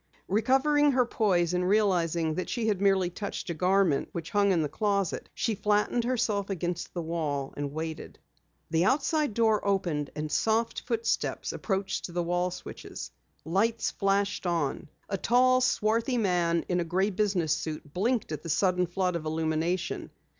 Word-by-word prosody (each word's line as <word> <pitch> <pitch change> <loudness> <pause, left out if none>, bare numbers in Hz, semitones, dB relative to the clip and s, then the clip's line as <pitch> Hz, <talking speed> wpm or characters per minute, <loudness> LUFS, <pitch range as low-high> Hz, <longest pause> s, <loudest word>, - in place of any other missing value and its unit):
Recovering 270 +7 +3
her 250 -1 +3
poise 180 -7 +1
and 180 0 +1
realizing 170 -6 +2
that 185 - -3
she 235 -2 -1
had 205 -3 0
merely 190 -3 +3
touched 200 -1 -5
a - - -1
garment 180 -3 +2
which 165 -1 -5
hung 200 -1 +3
in 170 -4 +2
the - - 0
closet, 200 +2 -1
she 230 - 0
flattened 210 +3 +1
herself 220 -5 0
against 175 -2 -3
the 175 - -2
wall 150 -4 -2
and 145 -1 -3
waited. 160 +1 -6 0.5
The 165 +1 +3
outside 280 - +1
door 220 -2 +3
opened 175 -8 0
and 150 0 -4
soft 225 +1 +1
footsteps 460 0 -1
approached 190 -3 -2
the 175 0 -1
wall 175 +1 0
switches. 180 - -8 0.3
Lights 220 +7 +1
flashed 200 -1 0
on. 160 -4 -1 0.2
A 195 - -3
tall, 255 +3 +4
swarthy 230 +1 +1
man 175 -5 +1
in 180 -1 +1
a - - +1
gray 185 +5 0
business 190 -6 +1
suit 155 -2 -5
blinked 220 +1 0
at 150 -2 -4
the 165 - -7
sudden 180 +2 +2
flood 180 0 -1
of 165 -2 -4
illumination. 160 +3 -1
190 Hz, 160 wpm, -28 LUFS, 170-215 Hz, 0.5 s, tall